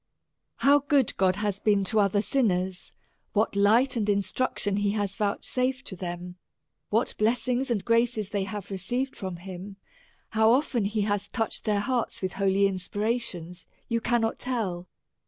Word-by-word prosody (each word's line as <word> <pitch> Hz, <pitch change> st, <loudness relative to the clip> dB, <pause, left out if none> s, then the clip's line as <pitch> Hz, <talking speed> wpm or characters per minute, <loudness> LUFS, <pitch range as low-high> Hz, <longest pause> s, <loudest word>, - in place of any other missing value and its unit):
How 285 Hz, +1 st, +5 dB
good 285 Hz, -3 st, +2 dB
God 185 Hz, -1 st, +3 dB
hath 205 Hz, -1 st, -2 dB
been 205 Hz, -2 st, +3 dB
to 210 Hz, +3 st, +1 dB
other 205 Hz, 0 st, +2 dB
sinners, 190 Hz, -9 st, 0 dB, 0.4 s
what 215 Hz, 0 st, +1 dB
light 220 Hz, +7 st, +4 dB
and 210 Hz, -3 st, 0 dB
instruction 200 Hz, +1 st, 0 dB
he 205 Hz, 0 st, +1 dB
has 205 Hz, -2 st, -1 dB
vouchsafed 255 Hz, +5 st, -1 dB
to 190 Hz, -, -6 dB
them; 180 Hz, 0 st, -6 dB, 0.5 s
what 225 Hz, +3 st, +1 dB
blessings 245 Hz, +4 st, +1 dB
and 225 Hz, -5 st, -1 dB
graces 230 Hz, -3 st, +1 dB
they 200 Hz, -2 st, 0 dB
have 205 Hz, -1 st, -6 dB
received 245 Hz, +8 st, -2 dB
from 185 Hz, -2 st, -5 dB
him; 185 Hz, +2 st, -8 dB, 0.5 s
how 220 Hz, +1 st, +4 dB
often 250 Hz, -5 st, +1 dB
he 210 Hz, +1 st, 0 dB
has 205 Hz, -1 st, 0 dB
touched 225 Hz, +1 st, -3 dB
their 210 Hz, -2 st, +2 dB
hearts 240 Hz, -2 st, -2 dB
with 185 Hz, -, 0 dB
holy 195 Hz, 0 st, +2 dB
inspirations, 190 Hz, -2 st, -3 dB, 0.2 s
you 230 Hz, -1 st, 0 dB
cannot 225 Hz, -1 st, +1 dB
tell. 195 Hz, -9 st, -2 dB
205 Hz, 155 wpm, -27 LUFS, 195-235 Hz, 0.5 s, How